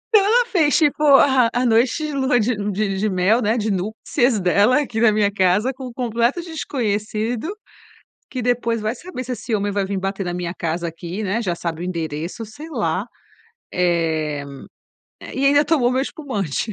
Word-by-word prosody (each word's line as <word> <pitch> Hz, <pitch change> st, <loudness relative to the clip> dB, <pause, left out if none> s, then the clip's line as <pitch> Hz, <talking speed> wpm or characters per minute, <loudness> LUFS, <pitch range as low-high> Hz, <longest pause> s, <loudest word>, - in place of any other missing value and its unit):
Então 400 Hz, -, +7 dB
ela 480 Hz, +2 st, +4 dB
fez 325 Hz, -10 st, +2 dB
tipo 300 Hz, -2 st, +2 dB
a 265 Hz, -4 st, +5 dB
a 250 Hz, +1 st, 0 dB
noite 240 Hz, +7 st, +2 dB
de 300 Hz, -, -4 dB
lua 265 Hz, -2 st, +2 dB
de 225 Hz, +2 st, +1 dB, 0.2 s
de 195 Hz, -1 st, -1 dB
de 215 Hz, +1 st, +1 dB
mel, 190 Hz, +6 st, +2 dB
né, 220 Hz, +2 st, +1 dB
de 215 Hz, -1 st, -1 dB
núpcias 220 Hz, +5 st, 0 dB
dela 200 Hz, +9 st, +3 dB
aqui 230 Hz, -5 st, -3 dB
na 225 Hz, -2 st, +6 dB
minha 205 Hz, -1 st, +2 dB
casa, 195 Hz, +6 st, +2 dB
com 260 Hz, 0 st, -8 dB
um -, -, -8 dB
completo 235 Hz, +4 st, 0 dB
desconhecido, 235 Hz, -6 st, -2 dB, 0.8 s
que 255 Hz, -, -4 dB
depois 235 Hz, -1 st, 0 dB
vai 215 Hz, +3 st, -2 dB
saber 255 Hz, -5 st, -7 dB
se 250 Hz, -, -3 dB
esse 235 Hz, -1 st, -5 dB
homem 205 Hz, -1 st, 0 dB
vai 200 Hz, -1 st, 0 dB
vim 195 Hz, 0 st, -2 dB
bater 195 Hz, 0 st, -3 dB
na 175 Hz, -, -3 dB
minha 175 Hz, 0 st, -3 dB
casa 170 Hz, +1 st, -2 dB
aqui, 170 Hz, +5 st, -6 dB
né. 205 Hz, +3 st, -1 dB
Já 185 Hz, -6 st, -1 dB
sabe 170 Hz, -1 st, -4 dB
o -, -, -3 dB
endereço, 170 Hz, +4 st, -4 dB
sei 295 Hz, +10 st, -11 dB
lá, 195 Hz, -, -1 dB, 0.7 s
eh 160 Hz, -4 st, 0 dB, 0.8 s
eh, -, -, -9 dB
e 275 Hz, -, +2 dB
ainda 285 Hz, +1 st, +5 dB
tomou 285 Hz, -6 st, +2 dB
o -, -, 0 dB
meu 260 Hz, +1 st, +1 dB
espumante. 215 Hz, -, -3 dB
220 Hz, 195 wpm, -21 LUFS, 190-255 Hz, 0.8 s, Então